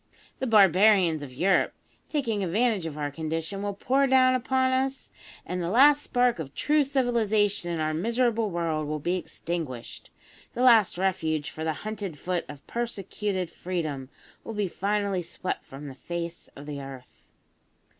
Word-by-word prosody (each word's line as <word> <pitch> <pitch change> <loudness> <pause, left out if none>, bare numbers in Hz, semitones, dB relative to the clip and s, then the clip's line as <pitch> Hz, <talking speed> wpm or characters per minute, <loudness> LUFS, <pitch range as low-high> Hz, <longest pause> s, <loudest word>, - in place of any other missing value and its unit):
The 265 - -1
barbarians 195 -5 +5
of 140 -3 -7
Europe, 185 +9 +2 0.3
taking 230 -9 -1
advantage 200 0 +1
of 150 -2 -7
our 145 -1 -2
condition, 165 +5 -3
will 205 -1 -3
pour 270 +6 +2
down 260 -1 +5
upon 260 +1 +1
us, 265 +1 -1 0.3
and 180 0 -3
the 170 - -2
last 285 +7 +6
spark 245 - +1
of 140 -3 -6
true 300 0 +3
civilisation 220 -8 +1
in 170 -1 -2
our 155 0 0
miserable 230 +4 +1
world 165 -4 -1
will 155 +1 -2
be 175 +5 -1
extinguished 165 -8 -5 0.5
the 245 - 0
last 225 -8 +6
refuge 160 -5 0
for 160 - -6
the 160 0 0
hunted 205 -7 -4
foot 175 +3 -2
of 140 -1 -10
persecuted 200 -5 -3
Freedom 155 -7 -4 0.3
will 225 - -6
be 205 -2 0
finally 200 +1 -1
swept 175 +2 -4
from 140 +2 -9
the 135 - -7
face 170 +4 -6
of 140 - -10
the 145 -1 -5
earth!" 135 -2 -11
190 Hz, 160 wpm, -27 LUFS, 160-230 Hz, 0.5 s, last